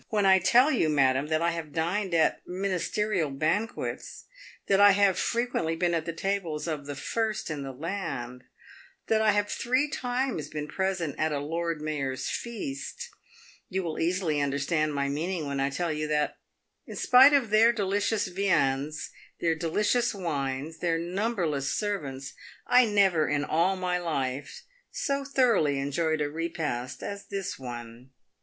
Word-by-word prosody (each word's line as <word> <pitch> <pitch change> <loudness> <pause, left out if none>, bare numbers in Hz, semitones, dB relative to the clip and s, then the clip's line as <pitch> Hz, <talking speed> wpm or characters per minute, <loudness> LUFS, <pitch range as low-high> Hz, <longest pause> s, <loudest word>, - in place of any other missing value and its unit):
" - - -45
When 210 -2 +1
I 190 0 +6
tell 245 +10 +5
you, 195 - +2
madam, 135 -1 +2
that 155 +1 0
I 170 - +2
have 165 -3 -5
dined 175 +4 -1
at 160 - +2
ministerial 190 -1 -1
banquets, 155 - -2 0.4
that 195 0 +3
I 205 0 +8
have 200 -1 +4
fre 235 - 0
quently 165 -10 -2
been 175 0 +1
at 165 -1 -1
the 170 - -2
tables 170 -3 -2
of 150 -3 -4
the 145 - -4
first 215 +5 -2
in 150 -2 -4
the 135 -1 -5
land, 130 -5 -5 0.7
that 220 -1 +3
I 215 -1 +5
have 205 0 +1
three 255 +7 0
times 250 - -2
been 150 -1 -5
present 185 -4 -1
at 155 0 +1
a 145 - 0
Lord 165 +2 -3
Mayor's 140 -4 -2
feast, 235 - -5 0.6
you 190 0 -1
will 160 -2 -4
easily 165 -3 0
under 140 0 0
stand 155 +1 0
my 140 0 0
meaning 160 +4 -2
when 140 -1 -3
I 135 0 +1
tell 165 +3 -2
you 155 0 -2
that, 150 -1 0 0.5
in - - -8
spite 260 +3 +7
of 255 -7 +2
their 225 +2 +6
delicious 205 0 0
viands, 155 -6 0 0.3
their 165 -1 +2
delicious 210 +9 +1
wines, 145 -4 -3
their 170 -2 +1
numberless 175 - -1
servants, 140 -11 -3 0.3
I 250 0 +6
never 195 -7 +3
in 145 0 0
all 170 +6 +2
my 180 -1 -1
life 145 - -3 0.3
so 275 0 -2
thoroughly 235 - +2
enjoyed 155 +3 0
a 145 - +1
repast 150 -5 -4
as 200 0 -6
this 195 -6 -4
one. 120 0 -8
170 Hz, 165 wpm, -28 LUFS, 145-200 Hz, 0.7 s, I